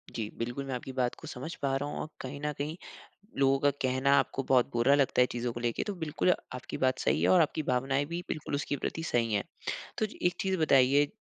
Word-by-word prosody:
जी, 110 Hz, -2 st, -2 dB
बिल्कुल 120 Hz, +4 st, -3 dB
मैं 135 Hz, -, -4 dB
आपकी 130 Hz, +2 st, -6 dB
बात 125 Hz, -1 st, +1 dB
को 160 Hz, -, -10 dB
समझ 145 Hz, +3 st, -6 dB
पा 135 Hz, -1 st, +1 dB
रहा 145 Hz, +2 st, -3 dB
हूँ -, -, -5 dB
और -, -, -3 dB
कहीं 135 Hz, +2 st, -6 dB
न 150 Hz, -, -1 dB
कहीं 150 Hz, +3 st, -3 dB, 0.6 s
लोगों 135 Hz, 0 st, +4 dB
का 145 Hz, -, +4 dB
कहना 130 Hz, +1 st, +2 dB
आपको 135 Hz, -, -1 dB
बहुत 130 Hz, -1 st, +3 dB
बुरा 120 Hz, +4 st, +4 dB
लगता 140 Hz, -3 st, +3 dB
है -, -, +7 dB
चीज़ों 120 Hz, 0 st, -2 dB
को -, -, -5 dB
लेके। 120 Hz, -1 st, -1 dB
तो 205 Hz, -, -1 dB
बिल्कुल 160 Hz, +1 st, +1 dB, 0.2 s
आपकी 125 Hz, -, -6 dB
बात 130 Hz, 0 st, +1 dB
सही 70 Hz, +4 st, +1 dB
है 90 Hz, -, +3 dB
और 95 Hz, -, +6 dB
आपकी 155 Hz, -, 0 dB
भावनाएँ 135 Hz, +2 st, +1 dB
भी 170 Hz, +3 st, -4 dB
बिल्कुल 150 Hz, -2 st, -3 dB
उसके 145 Hz, 0 st, -2 dB
प्रति 160 Hz, +4 st, -3 dB
सही 115 Hz, -7 st, 0 dB
हैं। 100 Hz, -, +1 dB, 0.5 s
तो 220 Hz, -, +2 dB
जी, -, -, -9 dB
एक 180 Hz, -, +2 dB
चीज़ 190 Hz, -1 st, 0 dB
बताइए 140 Hz, -1 st, +4 dB
135 Hz, 240 wpm, -30 LUFS, 125-145 Hz, 0.6 s, है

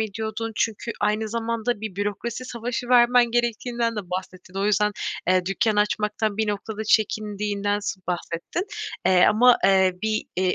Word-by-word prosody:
ediyordun? 220 Hz, +1 st, -3 dB
Çünkü 225 Hz, +1 st, -1 dB
aynı 215 Hz, +1 st, 0 dB
zamanda 230 Hz, 0 st, -2 dB
bir 215 Hz, -4 st, -6 dB
bürokrasi 210 Hz, +5 st, -3 dB
savaşı 240 Hz, 0 st, -4 dB
vermen 245 Hz, -1 st, +5 dB
gerektiğinden 235 Hz, -1 st, -1 dB
de -, -, -1 dB
bahsettin. 185 Hz, 0 st, -6 dB
O 200 Hz, -, 0 dB
yüzden, 210 Hz, 0 st, +2 dB, 0.4 s
eee, 185 Hz, -1 st, +3 dB
dükkân 215 Hz, +2 st, +1 dB
açmaktan 210 Hz, 0 st, 0 dB
bir 220 Hz, -1 st, 0 dB
noktada 215 Hz, +1 st, -4 dB
çekindiğinden 205 Hz, -1 st, 0 dB
s 195 Hz, -2 st, -4 dB
bahsettin. 175 Hz, -, -3 dB, 0.4 s
Eee, 180 Hz, -1 st, +6 dB
ama, 240 Hz, +3 st, +6 dB
eee, 190 Hz, -1 st, +5 dB
bir, 215 Hz, 0 st, 0 dB
iii, 185 Hz, -1 st, +1 dB
215 Hz, 150 wpm, -24 LUFS, 200-230 Hz, 0.4 s, Eee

